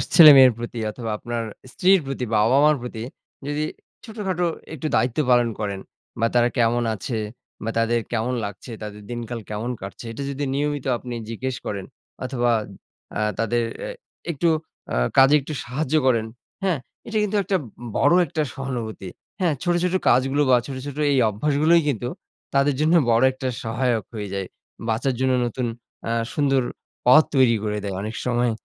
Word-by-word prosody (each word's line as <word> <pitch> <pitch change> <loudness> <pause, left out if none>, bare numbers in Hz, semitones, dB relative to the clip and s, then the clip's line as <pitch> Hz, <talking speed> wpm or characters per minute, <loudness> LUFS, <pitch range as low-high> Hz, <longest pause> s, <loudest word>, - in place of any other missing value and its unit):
ছেলেমেয়ের 140 -7 +10
প্রতি 120 0 -5
অথবা 115 +1 -6
আপনার 120 +1 -3 0.3
স্ত্রীর 190 +8 +4
প্রতি 135 -2 -3
বাবা-মার 135 +8 +5
প্রতি 120 -2 -6 0.4
যদি 145 +1 -1 0.4
ছোটখাটো 195 -6 -2 0.3
একটু 155 0 -3
দায়িত্ব 125 +3 +1
পালন 120 -1 +4
করেন 100 -2 -2 0.4
বা 115 - +3
তারা 120 0 +5
কেমন 120 0 +3
আছে 110 +3 -3 0.4
বা 110 - -2
তাদের 115 +1 +2
কেমন 120 +2 0
লাগছে, 100 +4 -8
তাদের 105 0 -7
দিনকাল 120 0 -4
কেমন 110 +3 -3
কাটছে 100 +4 -8
এটা 115 +5 -5
যদি 140 +1 -3
নিয়মিত 145 0 -1
আপনি 125 0 -7 0.2
জিজ্ঞেস 130 +3 -3
করেন, 100 -2 -4 0.4
অথবা 120 -2 +1 0.7
আ - - -1 0.2
তাদের 115 +1 +1 0.2
এ - - -5 0.4
একটু 170 +2 0 0.5
আ - - +1 0.2
কাজে 135 +2 +7
একটু 145 +3 -6
সাহায্য 135 +4 -2
করেন, 115 -4 +3 0.4
হ্যাঁ? 180 -7 +1 0.3
এটা 225 -1 -2
কিন্তু 210 0 0
একটা 190 +1 +1 0.4
বড় 145 +5 +4
একটা 155 0 -2
সহানুভূতি। 120 -8 -5 0.3
হ্যাঁ, 175 -4 +2
ছোট, 175 - +2
ছোট 180 0 +1 0.2
কাজগুলো 135 +4 +3
বা 125 - +7
ছোট, 135 - -5
ছোট 145 0 -6 0.2
এই - - +2
অভ্যাসগুলোই 150 +9 +3
কিন্তু 120 -3 -2 0.5
তাদের 140 0 +3
জন্য 155 +2 +3 0.2
বড় 115 +1 +4
একটা 130 0 -4 0.2
সহায়ক 115 -1 0
হয়ে 105 -2 -4
যায়। 95 -1 -3 0.4
বাঁচার 120 +4 +1
জন্য 130 0 +2
নতুন 120 +1 -2 0.4
আ - - 0 0.2
সুন্দর 135 -3 +2 0.4
পথ 150 +6 +8
তৈরি 130 -3 +5
করে 105 0 -1
দেয় 100 -2 -3
অনেক 110 +2 -5
সময়। 120 -1 +1
125 Hz, 160 wpm, -23 LUFS, 115-145 Hz, 0.7 s, ছেলেমেয়ের